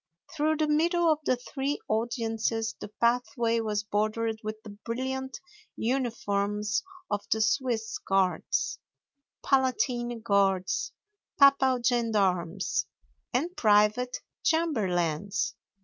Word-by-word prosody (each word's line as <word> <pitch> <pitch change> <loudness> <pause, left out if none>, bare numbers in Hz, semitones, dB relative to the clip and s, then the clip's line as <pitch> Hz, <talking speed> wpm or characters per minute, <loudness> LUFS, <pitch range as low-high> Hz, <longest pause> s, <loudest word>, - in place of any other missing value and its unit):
Through 310 +1 +1
the 310 0 +1
middle 335 +2 +3
of 305 - +1
the 255 - +3
three 270 +3 -3
audiences 225 0 -1
the - - -6
pathway 235 +1 +1
was 210 -2 -1
bordered 215 +2 -1
with 215 0 -5
the 215 - -9
brilliant 265 +3 -3 0.4
uniforms 210 -4 -1 0.3
of 205 0 -1
the 220 - +3
Swiss 220 0 0
Guards, 195 -2 0 0.7
Palatine 250 -3 +1
Guards, 195 -3 +1 0.5
papal 265 -3 +5
gendarmes, 195 - +1 0.4
and 330 +9 -1
private 215 +3 +3 0.3
chamberlains. 195 - 0
225 Hz, 100 wpm, -28 LUFS, 205-260 Hz, 0.7 s, papal